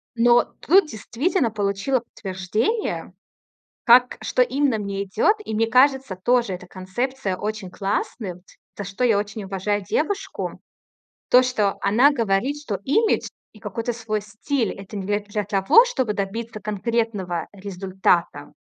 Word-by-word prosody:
Но 240 +1 +5 0.2
тут 370 +2 +4
действительно 265 - -1
получила 205 +5 0
подтверждение, 215 - -3 0.7
как 250 +1 +5
что - - +1
именно 255 0 +2
мне 200 -1 -3
идёт, 205 - +2
и, 220 - -5
мне 225 +1 +1
кажется, 260 -3 +3
тоже 235 +2 +1
эта 180 0 -8
концепция 195 +4 -3
очень 210 -1 -4
классным, 195 -1 -3 0.4
за 205 - -4
что 195 +6 -4
я 230 -4 +4
очень 205 +1 -4
уважаю 195 +1 -2
девушку. 385 - -2 0.7
То, 250 - +7
что 220 -6 0
она 235 +9 +5
говорит, 235 +2 0
что 225 -9 -3
имидж 435 - +2 0.3
и 215 - -16
какой-то 225 +3 -3
свой 225 -2 -3
стиль- 220 +3 -2
это 195 +1 -8
не 195 - -4
для 205 0 +1
для 210 0 -4
того, 195 - +5
чтобы 260 - -1
добиться 215 +3 -4
конкретного 210 -4 -2
результата, 185 -6 -1
215 Hz, 140 wpm, -23 LUFS, 195-250 Hz, 0.7 s, То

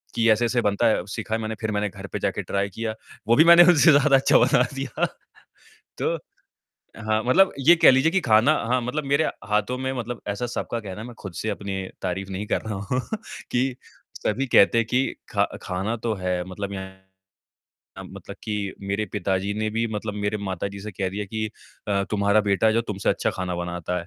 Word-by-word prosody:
कि 115 0 +3
ऐसे-ऐसे 120 +2 +2
बनता 105 +2 +2
है 110 - +3
अब 90 - -8
सीखा 110 - -5
है - - -2
मैंने 110 0 -3
फ़िर 110 -1 -1
मैंने 105 0 -1
घर 95 0 -9
पे - - -2
जाके - - -1
ट्राई 100 0 -1
किया 110 +3 -4 0.3
वो 115 - +5
भी 155 - +7
मैंने 170 +1 +9
उनसे 170 -2 +6
ज़्यादा 145 -1 +5
अच्छा 135 - +4
बना 125 +1 +4
दिया 135 -3 -1 0.9
तो - - 0 0.8
हाँ, 110 0 -1
मतलब 185 +10 +4
ये 160 +6 +6
कह 165 - +7
लीजिए 130 +5 +3
कि 190 - +2
ख़ाना 110 -3 +4 0.2
हाँ, 125 +1 +1
मतलब 135 +5 -3
मेरे 140 +3 +2 0.2
हाथों 105 +4 0
में 130 +1 -2
मतलब 120 -1 -5
ऐसा 100 +4 -2
सबका 120 - -3
कहना 105 0 -7
मैं 120 0 -9
ख़ुद 95 -3 -7
से 110 - -2
अपनी 100 -2 -4 0.2
तारीफ़ 95 +2 -3
नहीं 95 +2 -4
कर - - 0
रहा 110 -2 -5 0.2
हूँ 125 +1 +1 0.5
कि 125 +1 0 0.4
सभी 130 +6 -1
कहते 110 - +6
हैं 115 -1 +2
कि 125 +3 +2 0.2
ख़ा - - +2 0.2
ख़ाना 95 +5 -2
तो 115 - +1
है 90 -1 -1
मतलब 100 +2 -5
यहाँ 95 0 -8 1.0
मतलब - - -10
कि 105 -2 -3
मेरे 100 +2 -2
पिताजी 95 0 -1
ने 110 +1 -1
भी 115 +2 0
मतलब 105 0 -4
मेरे 105 +1 -1
माताजी 100 0 -4
से 105 +2 -6
कह 95 0 -2
दिया 105 +2 -4
कि 110 +2 -3 0.4
अ, 100 -1 +1
तुम्हारा 100 0 +3
बेटा 105 +1 +2
जो 115 - +2
तुमसे 105 -4 -3
अच्छा - - 0
खाना 90 -1 -4
बनाता 90 0 -3
है। 85 - -6
110 Hz, 205 wpm, -24 LUFS, 100-120 Hz, 1.0 s, मैंने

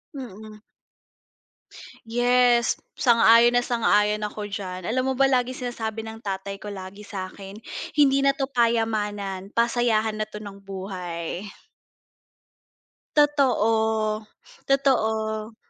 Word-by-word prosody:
Mm. 215 -4 -9 1.5
Yes, 245 +1 +3 0.2
sang-ayon 235 0 +5
na 245 - +1
sang-ayon 210 -3 +2
ako 210 0 -4
diyan. 185 -3 -6
Alam 255 +5 0
mo 265 - +1
ba 275 - +5
laging 255 -1 0
sinasabi 225 -2 -4
ng 220 0 -9
tatay 195 -1 -5
ko 210 - -6
lagi 195 0 -8
sa'kin, 195 0 -8 0.4
"Hindi 275 -1 +5
na 275 - +4
'to 270 - 0
payamanan, 215 -6 -1
pasayahan 230 -1 +1
na 215 - -3
'to 210 - -8
ng 200 -2 -9
buhay." 185 -1 -6 1.7
Totoo, 220 -7 +2 0.4
totoo. 220 -5 +1
220 Hz, 105 wpm, -24 LUFS, 205-245 Hz, 1.7 s, sang-ayon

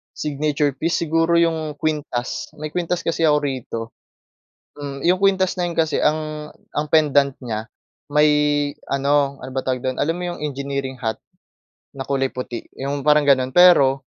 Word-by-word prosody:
Signature 150 -1 -1
piece, 165 +3 -1
siguro, 165 +2 +2
yung 160 -3 0
kwintas. 150 -6 -3
May 155 0 -6
kwintas 180 0 -2
kasi 165 0 -1
ako 150 -2 +4
rito. 130 -5 -3 1.0
Hmm, 140 -1 -6
yung 180 +2 +4
kuwintas 190 -2 +3
na 180 - 0
'yon - - -5
kasi 160 -2 +1
ang 155 0 -1 0.2
ang 150 +1 -1
pendant 145 -3 +3
niya, 110 -3 -4 0.5
may 150 +1 +5 0.6
ano, 140 0 +1
ano 130 - -7
ba 130 - -1
tawag 130 -1 -1
do’n, 130 0 -2
alam 160 +3 +1
mo 180 - -5
yung - - -9
engineering 140 -2 -4
hat 110 -3 -2 0.8
na 135 - -4
kulay 135 -1 +1
puti, 125 -2 -6 0.2
yung 140 +1 -2
parang 150 0 +4
gano’n. 130 -2 +3
Pero 140 -7 +6
145 Hz, 160 wpm, -21 LUFS, 135-155 Hz, 1.0 s, Pero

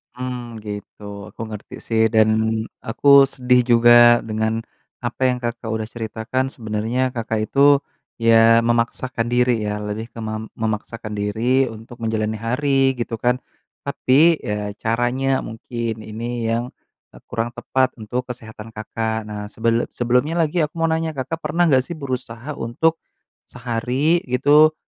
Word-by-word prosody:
Hmm, 125 -3 -6
gitu. 105 0 -8 0.3
Aku - - -11
ngerti 105 -2 -8
sih 110 -1 +2
dan 110 -1 +5 0.6
aku 115 +5 -2 0.3
sedih 125 -1 +3
juga 120 0 +6 0.3
dengan 110 +1 -1 0.4
apa 120 +2 -4
yang, 125 - 0
Kakak 120 0 -4
udah 110 0 -2
ceritakan. 115 +3 -2
Sebenernya, 115 +2 -2
Kakak 115 -2 -2
itu 140 0 +5 0.4
ya 115 0 +5
memaksakan 120 +1 0
diri 125 -1 +2
ya 105 0 -2
lebih 105 +2 -5
ke - - -18
mem 110 0 -5
memaksakan 110 0 -4
diri 115 +6 +1
untuk 115 +2 -11
menjalani 110 -1 -1
hari, 135 +3 +1
gitu 120 -1 -4
kan. 125 +1 +2 0.5
Tapi, 145 +4 +3
ya, 105 0 -3
caranya 125 +4 +1
mungkin 115 0 -5
ini 115 +2 -4
yang, 120 +2 -2 0.4
eee, - - -15
kurang 115 +1 -2
tepat 130 +1 0
untuk 125 +4 -3
kesehatan, 115 -3 -9
Kakak. 110 +1 -3
Nah, 105 -1 -5
sebel 115 +1 +1
sebelumnya 125 +6 +1
lagi 160 +2 0
aku 150 - -11
mau 165 - +2
nanya, 160 0 -1
Kakak 135 +3 -4
pernah 170 +3 +2
nggak 130 -3 +4
sih 170 - -6
berusaha 130 -2 -5
untuk 160 +8 0 0.5
sehari 125 +7 0
gitu 145 +5 +5
120 Hz, 140 wpm, -21 LUFS, 110-130 Hz, 0.6 s, juga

